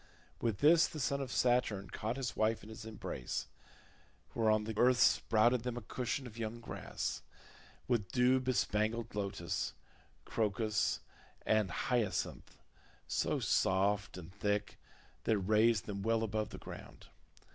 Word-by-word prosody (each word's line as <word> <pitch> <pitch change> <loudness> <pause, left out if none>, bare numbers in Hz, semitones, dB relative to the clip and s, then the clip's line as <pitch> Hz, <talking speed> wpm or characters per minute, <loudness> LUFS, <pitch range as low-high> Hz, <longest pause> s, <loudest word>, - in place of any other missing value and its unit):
With 115 -5 -1
this 165 +3 +6
the 155 - -7
son 140 +1 0
of 130 -2 -4
Saturn 110 -7 +1
caught 110 +4 -3
his 135 -2 -3
wife 110 0 +1
in 105 - -11
his 110 0 -9
embrace; 110 -1 -4 0.9
whereon 110 -2 +3
the 110 0 -4
earth 125 +3 +4
sprouted 120 +1 +4
them 120 0 -3
a - - -4
cushion 125 +5 -3
of 115 -2 -9
young 115 +1 -3
grass, 115 - -4 0.7
with 115 -6 0
dew 125 +1 +4
bespangled 115 -3 0
lotus, 100 -4 -2 0.5
crocus, 105 -1 0 0.4
and 110 -3 +3
hyacinth, 120 +1 -1 0.5
so - - 0
soft 100 +1 +1
and 90 0 -10
thick 105 0 -1 0.5
that - - +3
it - - +3
raised 110 +3 +3
them 100 -1 -4
well 115 +2 +1
above 110 -1 -1
the - - -8
ground. - - -10
110 Hz, 140 wpm, -34 LUFS, 105-120 Hz, 0.9 s, this